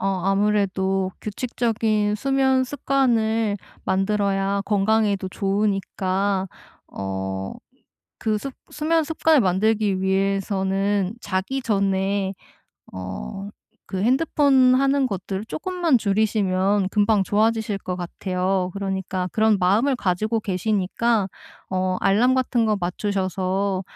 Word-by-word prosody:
어 - - -1 0.2
아무래도 195 -1 +1
규칙적인 215 -2 -1
수면 265 +2 +2
습관을 230 -6 +1 0.3
만들어야 195 0 0
건강에도 205 -1 +1
좋으니까 195 -1 -1 0.4
어 95 0 -4 0.7
그 215 -1 +1
습 270 +6 -5 0.2
수면 320 +2 +1
습관을 315 -1 +3
만들기 200 0 +1
위해서는 195 +1 0
자기 200 +8 -2
전에 195 -2 0 0.6
어 95 - -6 0.4
그 190 -1 -2
핸드폰 265 0 +4
하는 275 +1 +2
것들을 195 -1 -4
쪼끔만 345 0 0
줄이시면 200 -2 +1
금방 205 -1 +2
좋아지실 215 0 +1
거 180 -2 -5
같아요. 185 +1 -2
그러니까 190 -2 -3
그런 220 -1 +3
마음을 215 +10 +2
가지고 215 +2 0
계시니까 210 +2 0 0.4
어 185 0 0
알람 220 +6 +3
같은 250 -3 +1
거 215 -1 +2
맞추셔서 190 +1 -1
200 Hz, 245 characters per minute, -23 LUFS, 190-225 Hz, 0.7 s, 핸드폰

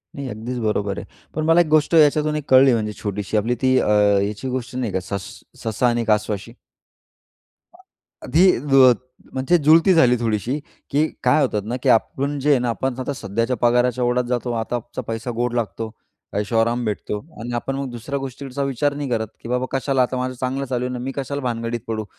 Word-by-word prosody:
नाही, 140 -1 -5
अगदीच 115 +3 -5
बरोबर 105 -2 -1
आहे. - - -6 0.3
पण 155 +1 -1
मला 165 +2 +5
एक 170 - 0
गोष्ट 155 +1 +2
याच्यातून 150 0 +4
एक 150 - -2
कळली 130 0 +7
म्हणजे 105 -2 -1
छोटीशी. 105 0 -2
आपली 115 +4 +1
ती 130 0 +3
अ, - - 0 0.3
याची 105 +4 -3
गोष्ट 130 0 -4
नाही 125 -4 -2
का, 95 - +1
सस 95 +1 -5 0.3
ससा 115 +2 +1
आणि 120 -1 +1
कासवाची? 105 0 -1 1.2
आ - - -18 0.5
आधी 180 +4 +4 0.3
ज 130 -2 +8 0.4
म्हणजे 135 +7 +2
जुळती 165 +5 +6
झाली 125 -7 +5
थोडीशी. 115 +4 -1 0.3
की 150 +3 +2 0.2
काय - - +4
होतात 105 -6 0
ना, 120 +4 -3
की - - 0
आपण 140 +5 +1
जे 145 +3 +1
आहे 140 - +5
ना 125 0 -1
आपण, 130 +3 -1
आता 130 +2 -2
सध्याच्या 115 +1 -2
पगाराच्या 120 +1 +2
ओढात 125 +1 +1
जातो, 125 0 -1
आताचा 120 +2 -4
पैसा 115 +2 -3
गोड 120 0 -1
लागतो, 115 -1 -3 0.5
ऐशो 105 +3 -1
आराम 120 +2 +1
भेटतो. 105 -1 -3 0.2
आणि 120 +2 -5
आपण 135 +3 -2
मग 135 -1 -4
दुसऱ्या 125 +4 -4
गोष्टीकडचा 135 +1 -5
विचार 140 +1 0
नाही 145 -1 -4
करत, 110 -2 0
की - - -9
बाबा 125 +1 0
कशाला 135 0 +1
आता 125 +1 -1
माझं 130 0 -2
चांगलं 130 +2 -1
चालू 125 -1 -2
आहे 125 - -3
ना 125 - -4
मी 130 +2 -4
कशाला 140 +1 -3
भानगडीत 115 -1 -2
पडू, 110 -1 -2
125 Hz, 200 wpm, -21 LUFS, 115-135 Hz, 1.2 s, ज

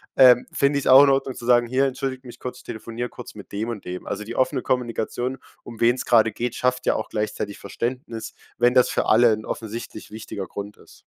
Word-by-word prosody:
ähm, 125 -2 +7
finde 140 +1 +2
ich's 140 - -3
auch 130 +2 +9
in 145 - +5
Ordnung 135 -1 +1
zu 120 0 -9
sagen: 120 -1 +5
„Hier, 130 +3 +1
entschuldige 130 -1 -4
mich 120 0 -11
kurz, 125 0 -6
ich - - -17
telefoniere 115 +2 -5
kurz 125 - -10
mit 105 - -12
dem 105 +3 -3
und 115 -4 -5
dem.“ 90 0 -6
Also, 105 - -4
die 115 +3 -7
offene 130 0 +1
Kommunikation, 125 +1 -2 0.2
um 115 -2 -11
wen's 120 +2 +2
grade 115 -2 +4
geht, 120 +3 -3
schafft 125 0 -1
ja - - +3
auch 110 - -4
gleichzeitig 105 -1 -3
Verständnis, 115 -2 -5 0.3
wenn 125 +1 +4
das 125 - +5
für - - 0
alle 115 +1 +5
'n 110 0 -4
offensichtlich 110 -1 -6
wichtiger 105 -2 -6
Grund 100 +2 -8
ist. - - -19
120 Hz, 220 wpm, -23 LUFS, 110-125 Hz, 0.3 s, auch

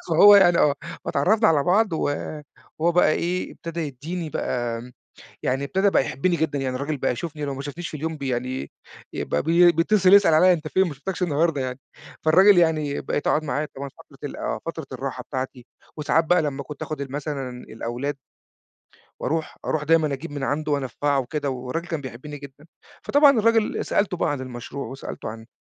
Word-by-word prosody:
فهو 205 +6 +8
يعني 175 -3 +5
آه، 145 -1 +4 0.3
فاتعرّفنا 215 +10 +3
على 150 -3 +3
بعض 195 +3 +2
و 155 - 0 0.7
وهو 170 +2 +2
بقى 175 -3 +4
إيه 180 +2 -2
ابتدا 170 0 -6
يدّيني 155 +3 -5
بقى 120 -4 -2
آمم 125 +2 -11 0.5
يعني 135 +2 0
ابتدا 190 +7 +2
بقى - - +3
يحبني 170 +7 0
جدًا، 150 -3 -1
يعني 130 -1 -2
الراجل 140 +3 -2
بقى 135 - 0
يشوفني 150 +2 -5
لو 140 - -3
ما 135 - -5
شافنيش 155 +5 -6
في 155 - -6
اليوم 160 +1 -3
ب - - -22
يعني 130 0 -3 0.4
يبقى - - -1
بي 170 +2 +6
بيتصل 185 +3 +3
يسأل 200 -5 +7
عليّا: 180 +4 +6
"أنت 155 -2 -4
فين 190 +3 +2
ما 150 - -5
شُفتكش 180 +7 -4
النهاردة 155 -2 +1
يعني." 130 0 -4 0.4
فالراجل 185 +5 +6
يعني 155 -4 +2
بقيت 145 - -2
أقعد 155 - +2
معاه 150 0 -2
طبعًا 140 +1 -6
فترة - - -18
ال - - -9
آه، - - -3
فترة - - -5
الراحة - - -5
بتاعتي، 130 -1 -5 0.3
وساعات 155 +2 +2
بقى 175 +2 +4
لمّا 140 -2 -3
كنت 150 +1 -10
آخد 155 -2 -4
ال 135 - -6
مثلًا 140 -2 -4
الأولاد 125 +3 -5 1.1
وأرُوح 160 +3 -2
أرُوح 150 -1 -1
دايمًا 160 -2 +3
أجيب 140 +4 -5
من 145 - -5
عنده 150 +2 -1
وأنفّعه 140 +1 0
وكده 140 +2 -2
والراجل 130 +6 -4
كان 160 -3 -2
بيحبني 140 +3 -8
جدًا. 140 +2 -13 0.4
فطبعًا 285 -4 +5
الراجل 225 0 +2
سألته 200 -3 0
بقى 170 - 0
عن 145 -2 -2
المشروع، 130 +2 -6
وسألته 135 +4 -7
عن 110 +1 -8
150 Hz, 190 wpm, -24 LUFS, 135-170 Hz, 1.1 s, فهو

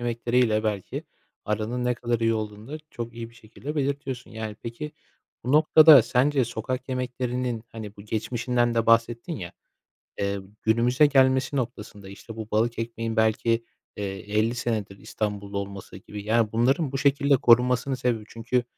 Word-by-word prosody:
yemekleri 120 +1 0
ile 110 -3 +2
belki 105 -3 -3 0.4
aranın 110 +4 -2
ne 125 0 +1
kadar 120 -1 -2
iyi 115 0 +2
olduğunu 105 +1 -5
da 155 - -5
çok 120 -1 -6
iyi 115 0 -7
bir - - -22
şekilde 120 +6 -8
belirtiyorsun, 140 -3 -3
yani. 110 -1 -6
Peki, 150 +7 -6 0.5
bu 130 - -1
noktada 155 -3 +8
sence 130 +3 +2
sokak 125 +3 -4
yemeklerinin, 125 -2 -2
hani, 110 -2 -8
bu 100 - -11
geçmişinden 120 +2 -1
de 115 -1 +1
bahsettin 115 +6 +2
ya, 90 -5 -7 0.7
eee, 100 0 -1 0.2
günümüze 120 +6 +4
gelmesi 130 0 +3
noktasında, 105 -5 -5
işte, 110 +3 -11
bu 110 0 -7
balık 115 +2 +1
ekmeğin 115 0 -3
belki, 115 +1 +2 0.3
eee, 105 - -3 0.3
50 115 +3 +2
senedir 110 -5 -3
İstanbullu 100 -1 -4
olması 100 -1 -7
gibi, 105 0 -9
yani, 110 0 +2
bunların 135 +5 +2
bu 135 - -2
şekilde 140 0 +3
korunmasının 125 +2 +4
sebebi 120 -4 -1
Çünkü 120 +2 -1
115 Hz, 155 wpm, -25 LUFS, 110-125 Hz, 0.7 s, noktada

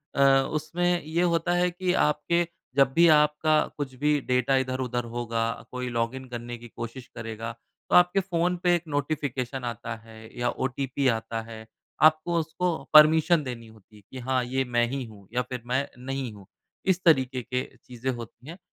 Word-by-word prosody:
अ, 135 -1 +5
उसमें 175 +3 0
ये 160 +3 -1
होता 175 0 +1
है 180 0 +2
कि 180 +1 -1
आपके 170 +3 +1 0.3
जब 135 -1 +4
भी 170 +4 +6
आपका 150 0 +4 0.2
कुछ 140 -3 -4
भी 150 +2 +2
डेटा 125 +1 +2
इधर-उधर 130 -2 -1
होगा 115 -1 -1 0.2
कोई 125 0 -4
लॉगिन 120 +2 -2
करने 120 0 -6
की 120 +1 -11
कोशिश 115 +2 -7
करेगा 115 0 -5 0.4
तो - - +3
आपके 180 +2 +5
फ़ोन 180 -1 0
पे 175 -1 +4
एक 170 - -2
नोटिफ़िकेशन 140 -3 -2
आता 120 0 -4
है 115 -1 -13 0.2
या 120 0 +1
ओटीपी 135 +1 -1
आता 115 -1 -1
है 110 -1 -10 0.4
आपको 155 +2 +4
उसको 165 +3 -1 0.2
परमिशन 155 +1 +7
देनी 120 -3 -6
होती 110 -1 -19
है 105 - -15
कि 130 - -7
हाँ, 130 0 0
ये 130 +2 -1
मैं 120 -1 +2
ही 135 +1 -3
हूँ, 105 -4 -14
या 125 - +2
फिर 125 -1 -6
मैं 130 +3 0 0.2
नहीं 135 -3 -3
हूँ। 100 -2 -13 0.4
इस 185 -1 +1
तरीके 130 -6 +3
के 125 +1 -2 0.2
चीज़ें 125 +1 -4
होती 120 +1 -9
हैं 170 - -8
130 Hz, 180 wpm, -26 LUFS, 120-155 Hz, 0.4 s, परमिशन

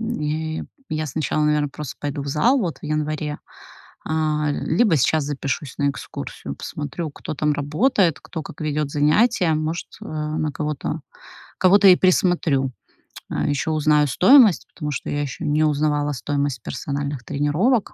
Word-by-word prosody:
М, 230 -3 -3
и 155 +1 -2 0.2
я 155 0 -2
сначала, 150 +1 -1
наверно, 150 -1 +2
просто 145 -1 -7
пойду 145 -1 -3
в 140 - -6
зал 235 - +3
вот 175 -6 -3
в - - -33
январе, 150 0 -2 0.7
э, - - -4 0.4
либо 170 +4 +2
сейчас 150 +3 +2
запишусь 140 -1 -3
на 140 - +2
экскурсию, - - -7
посмотрю, 155 - -5
кто 150 - -7
там 150 +1 +1
работает, 165 - +1
кто 160 - -6
как 145 - -11
ведёт 150 -1 -1
занятия, 165 +4 +3
может, 155 +2 -2
э, - - -9
на 155 0 -2
кого-то 150 +1 -3 0.6
кого-то 195 +2 +6
и 180 - +8
присмотрю. 170 -8 +2 0.6
Ещё 145 +2 -1
узнаю 150 -1 +3
стоимость, 215 - +6
потому 150 -3 -4
что 135 - -4
я 145 - -1
ещё 145 +3 -5
не 150 +1 +2
узнавала 150 -1 +1
стоимость 140 -2 -2
персональных 140 -1 -4
тренировок, 175 - +1
150 Hz, 150 wpm, -22 LUFS, 145-160 Hz, 0.7 s, и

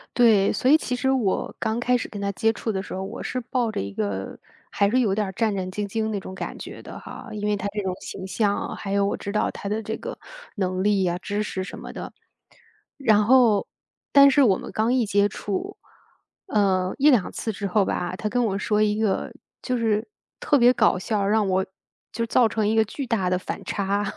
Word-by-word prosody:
对， 220 -5 +5
所 255 - +1
以 295 - +8
其 255 - -3
实 265 +2 +1
我 230 -8 0
刚 220 +2 -1
开 250 +1 +2
始 245 - -5
跟 205 -2 -7
他 200 0 -1
接 225 +4 +2
触 225 0 -3
的 190 -1 -2
时 - - -8
候， 190 +1 -3
我 - - -6
是 255 - -2
抱 245 -2 -1
着 - - -3
一 100 0 -4
个 100 -2 -3 0.3
还 200 0 +2
是 255 +3 +2
有 215 -6 +2
点 210 -2 0
儿 - - -5
战 220 0 0
战 185 -1 -3
兢 205 +1 -3
兢 220 +2 -2
的 220 - -1
那 205 - -2
种 190 0 -9
感 - - -5
觉 - - -8
的 - - -9
哈， - - -10
因 210 -1 -3
为 210 - +2
他 200 0 -3
这 210 - -2
种 185 -1 -2
形 190 - -7
象 205 0 +1
啊， - - -4
还 195 - -6
有 200 0 +2
我 - - 0
知 200 - -6
道 210 - +1
他 200 - -6
的 215 +2 -1
这 220 +1 -4
个 - - -7 0.4
能 185 -1 -1
力 200 -2 +2
啊， 175 0 0
知 205 +2 -2
识 190 -2 -4
什 - - -8
么 - - -8
的。 - - -7 0.9
然 220 -7 +4
后 235 -4 +5 0.4
但 280 0 +8
是 275 +1 +4
我 195 -6 +4
们 - - -8
刚 225 +3 +1
一 245 -4 +2
接 205 0 +2
触， 205 - -4 0.7
嗯， 190 -3 +1
1-2 265 -9 +4
次 225 - -3
之 200 0 -5
后 195 +1 +2
吧， 180 0 -2
他 215 - -3
跟 245 +2 +1
我 195 -3 -1
说 210 +1 +1
一 210 0 +2
个 215 -3 0 0.3
就 255 -1 -1
是 220 -2 0 0.3
特 290 - +3
别 245 -1 +6
搞 180 - +3
笑， 205 0 -1
让 210 0 +2
我 190 0 +2 0.5
就 230 - -2
是 230 - -2
造 245 - +4
成 220 -1 -1
一 220 - +1
个 220 - +5
巨 270 +6 -5
大 200 -6 0
的 180 0 +1
反 - - -6
差。 200 0 -1
210 Hz, 255 characters per minute, -24 LUFS, 195-230 Hz, 0.9 s, 以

